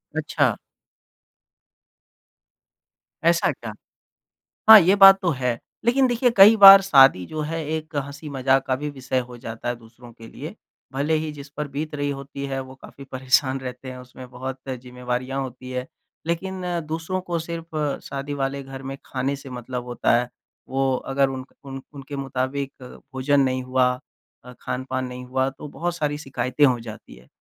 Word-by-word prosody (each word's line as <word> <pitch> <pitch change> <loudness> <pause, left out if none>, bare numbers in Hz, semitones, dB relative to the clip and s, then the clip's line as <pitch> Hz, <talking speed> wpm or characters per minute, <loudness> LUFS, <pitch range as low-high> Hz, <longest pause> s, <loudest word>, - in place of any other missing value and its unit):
अच्छा। - - +1 2.7
ऐसा - - +3
क्या? - - -8 1.0
हाँ, 220 -1 +13
ये 185 +2 +4
बात 195 -1 +9
तो 180 - +1
है। 125 -3 -1 0.3
लेक़िन 260 +3 +4
देखिए 245 0 +2
कई 200 +3 +9
बार 195 -1 +11
शादी 135 - +5
जो 155 - -5
है 160 +2 -3
एक 155 0 -7
हँसी 145 +2 -5
मज़ाक 135 -1 +1
का 130 - +1
भी 150 +3 -4
विषय 130 -2 -2
हो 125 -1 -11
जाता 115 -1 -7
है 120 - -2
दूसरों 120 +1 -16
के 115 -1 -13
लिए। - - -9 0.4
भले 145 +4 0
ही 155 0 -3
जिस 140 -1 -11
पर 150 -1 -2
बीत 150 +2 -5
रही 145 0 -2
होती 140 0 -6
है 135 -1 -3
वो 130 0 -12
काफ़ी 140 +1 -13
परेशान 130 +1 +1
रहते 130 0 -7
हैं, 130 - -9
उसमें 125 0 -12
बहुत 130 +1 -6
ज़िम्मेवारियाँ 125 +1 -4
होती 130 -1 -7
हैं। 125 0 -3 0.4
लेक़िन 185 +3 -3 0.3
दूसरों 165 +4 -3
को 175 -2 -3
सिर्फ़ 165 0 -6 0.3
शादी 140 +1 -5
वाले 140 0 -2
घर 135 0 -9
में 135 +1 -6
ख़ाने 135 +2 -2
से 135 0 -11
मतलब 125 0 -6
होता 120 -1 +1
है। 125 - -3 0.4
वो 135 0 +1
अगर 135 +1 0
उन 130 -1 -6 0.2
उन 135 -1 -7
उनके 140 +1 -8
मुताबिक 135 0 -3
भोजन 135 +2 -1
नहीं 130 -1 0
हुआ, 130 0 +2 0.6
अ, 125 - -11
ख़ानपान 130 0 -3
नहीं 125 0 -8
हुआ 130 +1 0
तो 135 +2 -10
बहुत 175 +4 -3
सारी 150 -3 -1
शिकायतें 135 0 0
हो 125 -3 +2
जाती 115 -2 -10
है। 65 - -19
135 Hz, 170 wpm, -23 LUFS, 130-150 Hz, 2.7 s, हाँ